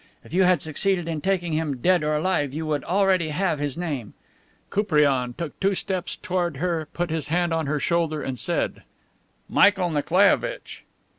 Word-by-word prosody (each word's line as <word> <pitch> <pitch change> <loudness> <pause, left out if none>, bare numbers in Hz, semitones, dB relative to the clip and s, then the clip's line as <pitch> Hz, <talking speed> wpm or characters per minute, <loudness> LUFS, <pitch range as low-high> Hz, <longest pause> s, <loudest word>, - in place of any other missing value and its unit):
If - - -14
you 185 - +3
had 180 -5 +3
succeeded 175 +3 0
in 160 -3 -3
taking 180 -3 0
him, 155 -3 -1
dead 175 +5 +2
or 150 0 +1
alive, 150 -4 0
you 160 +1 -3
would 150 -3 -1
already 185 -3 +2
have 165 0 0
his 145 -1 -3
name." 145 -11 -4 0.6
Koupriane 145 - +2
took 165 -4 -6
two 195 0 +1
steps 185 -1 -3
toward 175 -5 -2
her, 165 -1 -1
put 175 -2 -3
his 160 -2 -2
hand 175 +1 +1
on 160 -3 -1
her 150 +1 0
shoulder 160 0 0
and 130 -2 -4
said: 175 - -1 0.7
"Michael 195 -4 +4
Nikolaievitch." 200 - +1
165 Hz, 170 wpm, -24 LUFS, 150-185 Hz, 0.7 s, Michael